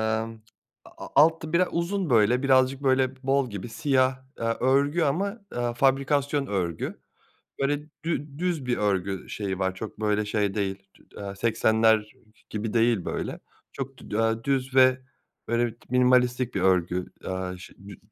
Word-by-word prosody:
aaa, 110 0 0 0.6
a - - -11
alt 160 +3 +5
biraz 170 +3 +2
uzun 175 0 -1
böyle, 120 +3 +4
birazcık 130 0 +3
böyle 130 -1 +2
bol 135 -2 +1
gibi 100 +3 -6
siyah, 130 +1 +1 0.2
eee, - - -2 0.2
örgü 140 +6 +2
ama, 195 +9 0 0.2
eee, 120 -1 -1
fabrikasyon 140 +2 +1
örgü. 90 -6 -3 0.6
Böyle 145 +1 +1 0.3
dü 150 -3 -3
düz 175 -6 -1
bir 125 -1 0
örgü 95 -2 -1
şeyi 95 -3 -3
var, 95 -1 0
çok 105 +2 -7
böyle 105 0 +1
şey 105 -1 0
değil, 95 -1 -3
tü - - -23
eee, 100 -1 -6
80'ler 110 0 +2 0.4
gibi 110 0 -4
değil 115 -5 +2
böyle. - - -4 0.3
Çok 135 0 -6
dü - - -8
eee, 115 0 +1
düz 135 -1 -1
ve 130 0 +6 0.5
böyle 120 +1 +2
bir 115 - -9
minimalistik 125 0 +3
bir - - 0
örgü, 90 -1 +2 0.2
aaa, 95 0 -4
şeyi 90 - -14
dü 100 - -10
120 Hz, 155 wpm, -26 LUFS, 105-135 Hz, 0.6 s, ve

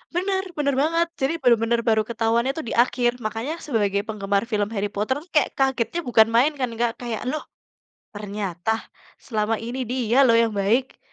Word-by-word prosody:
Benar, 380 +1 0
benar 280 -2 +1
banget, 330 +2 +2
jadi 270 +4 +1
benar-benar 235 -1 +3
baru 220 -1 +4
ketahuannya 235 +2 +1
tuh 320 - -4
di - - -3
akhir. 245 -1 0
Makanya 225 +7 -3
sebagai 205 -8 +1
penggemar 200 -2 -1
film 205 -1 +1
Harry 205 0 -2
Potter, 210 +6 0 0.4
kagetnya 265 +3 +1
bukan 220 -2 +5
main 260 +6 +5
kan 255 -2 0
Kak, 240 -1 +2
kayak, 235 -3 -4
"Loh 310 - -4 0.7
ternyata 205 -2 -4 0.6
selama 220 -2 0
ini 245 +2 -4
dia 245 -2 0
loh 230 - +5
yang 230 - +1
baik," 235 +7 0
235 Hz, 160 wpm, -23 LUFS, 215-265 Hz, 0.7 s, bukan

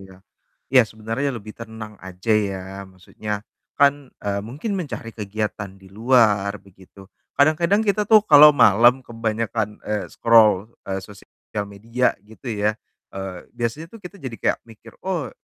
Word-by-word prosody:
iya. 95 -1 -14 0.6
Iya, 130 -2 +8
sebenarnya 115 +6 -3
lebih 105 0 -10
tenang 110 -2 -9
aja 95 +4 -4
ya, 100 -3 0 0.3
maksudnya 105 +3 -7 0.3
kan, 140 -2 +3
eee, 100 0 -1
mungkin 145 - -5
mencari 145 - -5
kegiatan 105 -1 -4
di 95 - -16
luar 105 -2 +2
begitu. 95 0 -17 0.3
Kadang-kadang 170 +8 +3
kita 210 +1 +2
tuh 215 -1 +7
kalo 150 -3 +9
malam 120 +2 +5
kebanyakan, 110 -2 -2
eee, 105 -2 -2
scroll, 110 -2 +4 0.2
eee, 95 0 -1
sosial 105 +1 -8
media 115 +5 -1
gitu 110 +4 -10
ya, 105 0 0 0.4
eee, 95 -2 -7
biasanya 120 +7 -3
tuh 225 - -10
kita 180 +3 -10
jadi 130 -8 -7
kayak - - +1
mikir, 115 0 -16
"Oh 175 -8 -2
110 Hz, 145 wpm, -22 LUFS, 100-130 Hz, 0.6 s, kalo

